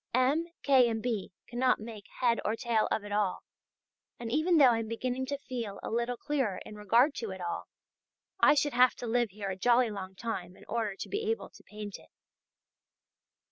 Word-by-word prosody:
M. 275 +6 +2 0.2
K. 260 -4 +5
and 225 -1 -1
B. 220 -4 -2
cannot 250 +2 +1
make 215 -2 -9
head 235 -2 +3
or 215 - 0
tail 230 -2 +1
of 215 - -1
it 205 - -8
all, 205 -2 0 0.8
and 230 -1 -5
even 320 +5 +3
though 270 -5 +8
I 230 - +1
am 225 - -3
beginning 250 +3 -2
to 280 +1 -2
feel 235 -7 -5
a - - -4
little 235 +2 -1
clearer 265 -10 -1
in 210 - -9
regard 230 +7 +3
to 225 - -3
it 190 0 -6
all, 175 -1 -4 0.7
I - - +6
should 290 0 +1
have 250 +1 +5
to - - -7
live 240 0 +1
here 200 0 -5
a - - -3
jolly 240 +4 +3
long 190 -2 -7
time 185 -4 -5
in - - -16
order 220 -3 -2
to - - -6
be 430 +2 -2
able 455 - -2
to - - -16
paint 210 -1 -8
it. - - -19
235 Hz, 205 wpm, -30 LUFS, 210-255 Hz, 0.8 s, though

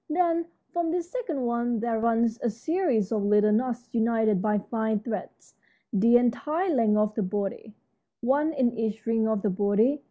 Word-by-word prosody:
Then, 335 0 +1 0.3
from 345 -1 0
this 345 +1 -3
second 370 - -3
one 235 -1 0
there 230 0 -1
runs 230 0 +1
a 240 - +1
series 235 - -1
of 215 -2 0
little 210 +1 +3
knots 245 +2 -1
united 225 -4 +2
by 210 0 +1
fine 220 +1 -1
threads 215 0 -7 0.4
the 230 +4 +5
entire 300 +9 0
length 225 -5 +3
of 210 0 +1
the 220 - -2
body, 205 +2 -4 0.4
one 285 +6 +1
in 255 -5 0
each 220 -1 -3
ring 225 -1 +1
of 220 -2 -1
the 210 - +1
body. 205 +9 +2
230 Hz, 170 wpm, -26 LUFS, 215-265 Hz, 0.4 s, the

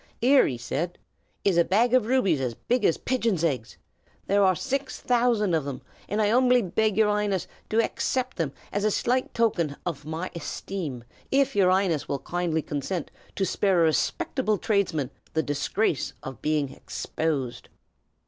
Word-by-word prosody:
"Here," 265 +3 +5
he 125 - -3
said, 150 +8 -3 0.5
"is 185 -4 +4
a - - +6
bag 225 +8 +2
of 250 -4 +4
rubies 200 - +2
as 125 -3 -2
big 245 - -1
as 165 - +3
pigeon's 230 -9 0
eggs. 130 -9 -1 0.5
There 200 +1 +3
are 185 -1 +4
six 270 - -3
thousand 235 -6 +2
of 160 -3 +2
them, 140 -2 -6 0.3
and 210 - -1
I 205 - +3
'umbly 250 0 +4
beg 215 +3 0
your 220 -1 +5
'Ighness 205 -3 0 0.2
to 220 - 0
haccept 255 +2 0
them 160 -6 -1 0.2
as 205 - 0
a 215 - +3
slight 250 +5 0
token 175 -11 +1
hof 160 -5 -3
my 160 +4 -4
hesteem, 160 -5 -5 0.3
if 275 -2 +2
your 190 -3 +4
'Ighness 185 -5 +1
will 140 - -1
kindly 170 -1 -2
consent 150 +4 -3 0.2
to 195 - +1
spare 185 -4 +2
a - - +5
respeckable 215 - 0
tradesman 180 - 0 0.2
the 160 - +2
disgrace 150 - -1
of 130 -1 -8
being 150 -2 0
hexposed." 140 -3 -3
190 Hz, 165 wpm, -26 LUFS, 155-225 Hz, 0.5 s, a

